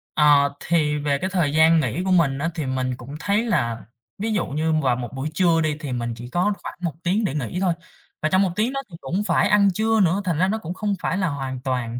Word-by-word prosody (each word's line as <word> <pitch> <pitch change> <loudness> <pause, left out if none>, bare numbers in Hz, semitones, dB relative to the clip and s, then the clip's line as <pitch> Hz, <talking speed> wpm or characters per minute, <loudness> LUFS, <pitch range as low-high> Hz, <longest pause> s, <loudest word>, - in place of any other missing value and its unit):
Ờ, 145 -2 +5
thì 150 -3 +1
về 145 -1 0
cái 185 +6 -2
thời 170 -6 0
gian 160 +1 +5
nghỉ 150 +5 -1
của 190 - -1
mình 150 -7 +3
á, 165 +4 -1
thì 155 -4 -3
mình 130 -1 -1
cũng 135 +4 -9
thấy 205 +5 +1
là 120 - -1 0.3
ví 220 +2 -2
dụ 205 - 0
như 155 +3 -1
vào 130 -3 +2
một 120 -2 -5
buổi 135 +3 -3
trưa 165 -1 +3
đi, 155 -2 0
thì 145 -4 -5
mình 120 -1 -2
chỉ 120 +1 -8
có 180 +9 +1
khoảng - - -6
1 170 -5 -2
tiếng 200 +6 +1
để 140 - -1
nghỉ 150 +5 -3
thôi. 185 -3 +2 0.5
Và 155 - +1
trong 185 +3 +3
1 195 - +2
tiếng 225 +6 0
đó 275 - -2
thì 170 - -10
cũng 180 +10 -2
phải - - +2
ăn 205 -1 +5
trưa 220 +3 +1
nữa, 190 +1 +3
thành 170 -4 0
ra 185 - +3
nó 215 +3 0
cũng 175 -5 -6
không 205 +1 -2
phải 185 - -1
là 190 -3 +1
hoàn 135 -4 -4
toàn 125 -2 -2
160 Hz, 265 wpm, -23 LUFS, 135-190 Hz, 0.5 s, Ờ